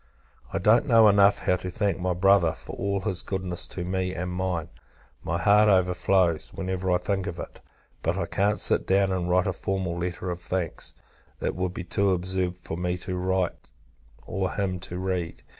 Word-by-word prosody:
I - - -1
don't 115 +6 +4
know 115 -4 +7
enough 100 0 +5
how 90 - +2
to 90 +1 -6
thank 100 -1 -1
my 90 0 0
Brother, 90 -3 +4
for - - -9
all 100 0 -1
his 95 -5 -1
goodness 95 -3 -3
to 90 - -5
me 95 0 -2
and 90 +1 -3
mine; 90 -3 -2 0.5
my - - -1
heart 105 +1 +5
overflows, 90 -2 +2
whenever 95 -1 -2
I 90 - +4
think 95 +1 -2
of 85 - -5
it: - - -8 0.4
but - - 0
I - - -1
can't 100 +1 0
sit - - +3
down, 95 0 +3
and 90 -1 -1
write 90 +1 +3
a - - 0
formal 95 -3 -2
letter 90 +1 -3
of 90 0 -5
thanks; 90 -3 -3 0.4
it - - -1
would 90 0 -2
be - - -4
too 100 +2 +1
absurd 90 0 -1
for 85 -2 -6
me 90 0 -1
to 90 +1 -5
write, 90 -1 -1 0.6
or 95 0 -2
him 95 -2 -2
to 90 0 -6
read. 90 -3 -3
95 Hz, 190 wpm, -26 LUFS, 90-95 Hz, 0.6 s, know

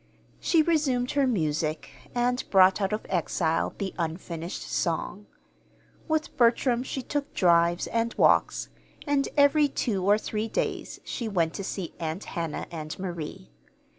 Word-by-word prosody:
She 325 -2 +3
resumed 280 -7 +1
her 280 -2 +2
music, 155 -7 -1 0.2
and 245 +1 +1
brought 190 +1 +5
out 195 0 0
of 215 - -2
exile 165 -2 0
the 195 -2 -3
unfinished 165 +1 -4
song. 185 +4 -2 0.8
With 315 -1 -1
Bertram 240 0 +3
she 265 0 -4
took 290 +2 -3
drives 170 -1 +3
and 230 0 0
walks; - - +3 0.4
and 285 -2 +1
every 290 +1 +5
two 210 -8 -1
or 205 +2 +5
three 220 0 -3
days - - -3
she 235 - -4
went 170 -5 +1
to 195 - -5
see 190 -3 -4
Aunt 165 +3 -3
Hannah 165 -3 -4
and 155 -2 -6
Marie. 170 - -6
200 Hz, 140 wpm, -27 LUFS, 170-250 Hz, 0.8 s, brought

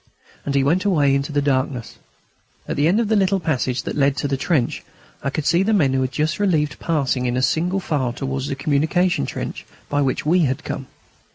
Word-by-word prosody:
And 140 - -1
he 135 - +3
went 165 +7 +2
away 150 -9 +3
into 140 +2 -1
the 145 -1 +1
darkness. 130 -3 -1 0.7
At - - -2
the 145 +2 +2
end 190 +6 +3
of 230 - +1
the 220 - +2
little 195 -1 +2
passage 135 -6 -1
that - - -4
led 140 -1 +2
to 145 - -1
the 140 - 0
trench 135 -2 0 0.4
I 140 - -1
could 145 +1 -3
see 170 +3 +3
the 215 +3 +2
men 145 -10 +3
who 135 - +1
had 130 0 -1
just 155 +4 -1
been 205 -1 +2
relieved 150 -4 0
passing 135 -6 0
in 125 +1 0
single 180 +7 +1
file 150 -7 -1
going 120 - -2
towards 135 0 -3
the - - -2
communication 155 - +1
trench - - -5 0.3
by 145 0 +1
which 135 0 -1
we 175 +4 +3
had 135 +3 -2
come. 135 - -5
145 Hz, 225 wpm, -21 LUFS, 135-170 Hz, 0.7 s, he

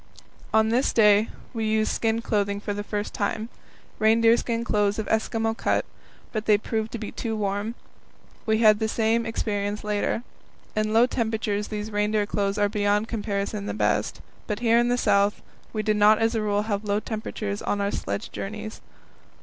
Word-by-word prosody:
On 220 0 +4
this 245 +4 +2
day 210 -1 +5 0.2
we 225 -2 -2
used 215 0 +1
skin 225 0 0
clothing 200 -2 0
for 205 0 -3
the 205 0 -4
first 205 0 -4
time 215 +2 -2 0.5
reindeer 225 +1 +5
skin 235 -1 -2
clothes 205 -3 +1
of 220 - -2
Eskimo 225 0 0
cut - - 0 0.5
but 215 -2 -3
they 210 -1 +6
proved 220 +1 -3
to - - -2
be 215 - -6
too 225 -2 -3
warm. 205 +2 -2 0.7
We 220 0 +3
had 215 -2 +5
the 220 - 0
same 225 +1 +1
experience 205 -2 -2
later. 210 +2 -1 0.5
In 215 0 0
low 225 +2 +6
temperatures 220 -4 -1
these 215 0 -5
reindeer 210 0 +1
clothes 200 0 -1
are 205 0 +3
beyond 205 +1 +1
comparison 205 -2 -3
the - - -3
best, - - 0 0.3
but 210 +1 -3
here 230 -1 +4
in 240 - +2
the 245 0 +2
South 200 -3 +2 0.3
we 215 -1 -2
did 215 -1 +1
not 210 +1 +6
as 225 +1 +1
a 225 - 0
rule 205 -1 +1
have 210 -1 -2
low 205 0 0
temperatures 215 -1 -4
on 205 - -1
our 200 0 0
sledge 100 0 -4
journeys. 215 +2 -6
215 Hz, 180 wpm, -25 LUFS, 205-225 Hz, 0.7 s, they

